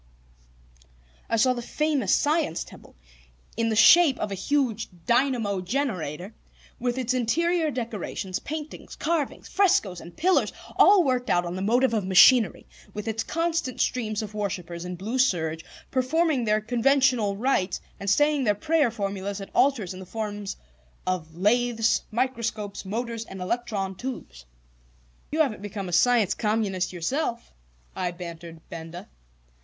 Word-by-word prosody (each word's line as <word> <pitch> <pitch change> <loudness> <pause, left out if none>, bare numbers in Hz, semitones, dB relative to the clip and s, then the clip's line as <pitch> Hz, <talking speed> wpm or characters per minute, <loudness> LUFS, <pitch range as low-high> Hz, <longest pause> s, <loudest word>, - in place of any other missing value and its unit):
I - - +1
saw 255 +3 +4
the 240 - -5
famous 285 -5 0
Science 300 - +1
Temple - - -15 0.6
in 230 0 0
the 220 - 0
shape 285 +5 +7
of 210 - -3
a - - -1
huge 230 +1 -1 0.2
dynamo 235 -6 +1
generator, 185 - -3 0.5
with 245 +1 -1
its 255 -1 0
interior 320 +7 +1
decorations, 225 -7 -4
paintings, 310 0 -7
carvings, 320 -3 -2
frescoes, 215 - +2
and 170 - -13
pillars, 365 +4 +2 0.2
all 400 -3 +6
worked 255 -3 0
out 175 0 +2
on 175 +1 -4
the 185 - -4
motive 240 +5 +2
of 210 -4 -1
machinery; 220 +5 +6 0.3
with 210 +1 -5
its 225 0 -1
constant 330 -5 -2
streams 220 -3 -1
of 210 0 -8
worshippers 180 -4 -4
in 180 0 -5
blue 215 +9 -3
serge, 165 -10 +1 0.3
performing 270 0 +1
their 215 0 +2
conventional 245 -2 +2
rites 215 -6 0 0.2
and 200 +1 -3
saying 295 +5 +3
their 210 -4 +2
prayer 310 +2 +2
formulas 200 -2 -4
at 195 - -9
altars 235 -10 +2
in 185 - -9
the 190 - -9
forms 205 -1 -5 0.5
of 165 -3 -3
lathes, 230 +4 +2
microscopes, 230 -4 -2
motors, 230 +3 -3
and 190 - -9
electron 195 -1 -2
tubes. 185 - -7 0.9
"You 315 +2 +2
haven't 250 -10 0
become 200 -1 -5
a - - -6
Science 225 +2 +4
Communist 210 -4 -1
yourself?" 235 - -3 0.4
I 185 -1 -1
bantered 170 -2 -9
Benda. 165 +1 -8
225 Hz, 145 wpm, -26 LUFS, 190-260 Hz, 0.9 s, shape